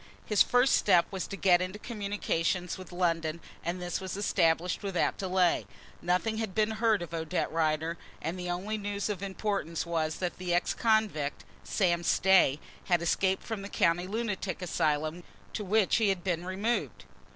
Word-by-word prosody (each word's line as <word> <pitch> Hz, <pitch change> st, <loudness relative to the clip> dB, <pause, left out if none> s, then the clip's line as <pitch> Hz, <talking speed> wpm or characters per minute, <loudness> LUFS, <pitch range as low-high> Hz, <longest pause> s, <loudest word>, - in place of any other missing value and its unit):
His 210 Hz, -2 st, +3 dB
first 245 Hz, +1 st, +4 dB
step 180 Hz, -4 st, +4 dB
was 190 Hz, -2 st, -3 dB
to 200 Hz, -, -5 dB
get 180 Hz, -3 st, +4 dB
into 185 Hz, +3 st, -3 dB
communication 200 Hz, -5 st, -2 dB
with 185 Hz, -2 st, -10 dB
London 165 Hz, -2 st, 0 dB, 0.2 s
and 175 Hz, +2 st, -2 dB
this 180 Hz, +1 st, -3 dB
was 190 Hz, 0 st, -5 dB
established 170 Hz, -3 st, +1 dB
without 195 Hz, -4 st, 0 dB
delay. 185 Hz, -2 st, +1 dB, 0.3 s
Nothing 180 Hz, +6 st, 0 dB
had 220 Hz, -4 st, -3 dB
been 215 Hz, 0 st, +2 dB
heard 220 Hz, -3 st, +2 dB
of 170 Hz, -, -9 dB
Odette 165 Hz, +2 st, -2 dB
Rider, 160 Hz, +1 st, 0 dB, 0.2 s
and 165 Hz, +4 st, -3 dB
the 180 Hz, 0 st, -4 dB
only 200 Hz, +5 st, -2 dB
news 205 Hz, 0 st, -3 dB
of 200 Hz, -3 st, -3 dB
importance 195 Hz, -4 st, -2 dB
was 160 Hz, -2 st, -1 dB
that 180 Hz, -1 st, -4 dB
the 180 Hz, -1 st, 0 dB
ex 175 Hz, -, +1 dB
convict, 215 Hz, -11 st, 0 dB, 0.2 s
Sam 175 Hz, -4 st, +1 dB
Stay, 180 Hz, -5 st, +4 dB, 0.3 s
had 175 Hz, -3 st, +2 dB
escaped 190 Hz, +3 st, +1 dB
from 220 Hz, -3 st, -4 dB
the 200 Hz, -, -7 dB
county 175 Hz, 0 st, +1 dB
lunatic 205 Hz, -3 st, -3 dB
asylum 155 Hz, 0 st, 0 dB, 0.3 s
to 210 Hz, -, -3 dB
which 205 Hz, 0 st, +3 dB
he 220 Hz, -3 st, +3 dB
had 190 Hz, -3 st, -1 dB
been 175 Hz, -2 st, -2 dB
removed. 205 Hz, +6 st, -2 dB
185 Hz, 170 wpm, -30 LUFS, 170-205 Hz, 0.3 s, first